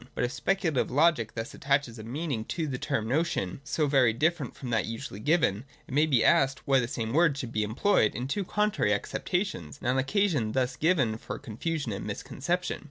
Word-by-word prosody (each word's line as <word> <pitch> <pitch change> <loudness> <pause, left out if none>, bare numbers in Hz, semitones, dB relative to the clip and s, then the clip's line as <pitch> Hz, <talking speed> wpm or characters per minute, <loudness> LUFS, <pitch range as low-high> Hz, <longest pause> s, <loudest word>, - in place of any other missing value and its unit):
But - - -1
if 125 - 0
Speculative 180 -5 0
Logic 140 -5 +3
thus 115 0 -5
attaches 140 -4 0
a - - -7
meaning 135 0 -3
to 165 +5 -2
the 130 -4 -3
term 140 -7 -1
notion 135 - -1
so 150 +2 0
very 135 -5 +4
different 155 +2 0
from 125 -3 -6
that 110 -2 +1
usually 115 -3 -6
given, 135 - +2 0.2
it - - -8
may 150 +3 +4
be 130 -6 +3
asked 135 0 +3
why 135 -1 +5
the 120 - -1
same 115 -1 -3
word 160 -2 +4
should 125 -5 -5
be 110 - 0
employed 110 - +2
in 125 +3 -3
two 200 +9 -1
contrarj' 210 - +1
acceptations, 140 - -3
and - - -5
an 130 +1 +2
occasion 145 - +1
thus 125 -1 0
given 135 -9 +1
for - - -6
con 115 -7 -9
fusion 155 -2 -2
and 100 - -4
misconception. 170 - -2
135 Hz, 205 wpm, -28 LUFS, 115-160 Hz, 0.2 s, why